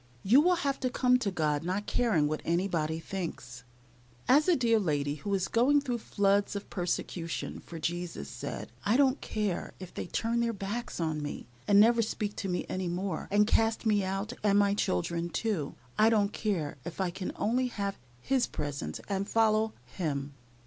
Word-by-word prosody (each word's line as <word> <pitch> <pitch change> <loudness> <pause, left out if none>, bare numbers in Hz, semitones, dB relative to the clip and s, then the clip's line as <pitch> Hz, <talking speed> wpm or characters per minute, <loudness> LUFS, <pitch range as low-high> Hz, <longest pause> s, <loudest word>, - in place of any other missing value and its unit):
You 245 +9 +6
will 360 +3 +4
have 280 -5 -1
to 255 - 0
come 250 0 +3
to 220 -5 0
God 155 -5 0
not 190 +4 -2
caring 205 -12 +2
what 155 +1 -2
anybody 165 -2 0
thinks. 160 -10 -6 0.6
As 290 +6 +5
a 360 - +5
dear 230 -4 +3
lady, 145 -6 0
who 155 +7 -5
is 190 -1 0
going 265 +5 +4
through 250 -4 -2
floods 200 -1 +1
of 200 - -6
persecution 175 -2 -3
for 170 - -9
Jesus, 170 - -3
said, 70 - -6
"I 220 +4 +3
don't 275 -1 +3
care 210 -5 -2
if 185 -2 -9
they - - -5
turn 230 +5 0
their 235 -1 +1
backs 205 +3 -4
on 160 -2 -1
me, 145 - -5 0.2
and 200 -1 +6
never 230 +2 +6
speak 210 -1 -2
to 195 - -3
me 180 - -1
any 185 -1 -2
more, 180 0 -3
and 205 +1 +4
cast 225 +1 +2
me 210 -2 +3
out, 195 +4 -2
and 205 -1 +3
my 200 -1 +4
children, 170 - -1
too. 175 -4 -2 0.2
I 220 +1 +7
don't 210 -2 +2
care 170 -10 -2
if 170 - -7
I 185 -2 0
can 185 +1 -4
only 250 +4 +1
have 200 -4 -3 0.2
His 260 - +1
presence 140 - -4
and 200 0 -2
follow 220 -1 +3
Him." 140 -1 -3
200 Hz, 185 wpm, -30 LUFS, 170-225 Hz, 0.6 s, I